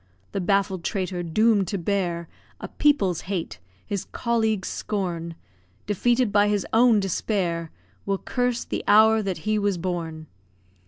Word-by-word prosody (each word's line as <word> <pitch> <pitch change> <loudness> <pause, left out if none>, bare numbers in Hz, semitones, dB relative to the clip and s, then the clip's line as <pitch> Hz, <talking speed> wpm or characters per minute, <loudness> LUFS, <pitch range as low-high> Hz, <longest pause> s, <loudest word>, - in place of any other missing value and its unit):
The 195 - -2
baffled 195 -1 +1
traitor, 185 -3 -2
doomed 200 +3 +2
to 200 - -2
bear 175 -2 -1 0.3
A - - -6
people's 200 - +2
hate, 175 - -3 0.3
his 200 -2 -3
colleagues' 220 -4 -1
scorn, 170 -5 -3 0.5
Defeated 240 +3 +1
by 205 0 +4
his 205 -1 0
own 230 -1 +5
despair, 180 -4 -1 0.4
Will 195 0 +1
curse 245 +3 -1
the - - -4
hour 220 +1 +6
that 195 -4 -2
he 215 0 +1
was 200 -2 0
born! 165 -3 -4
200 Hz, 140 wpm, -24 LUFS, 175-215 Hz, 0.5 s, hour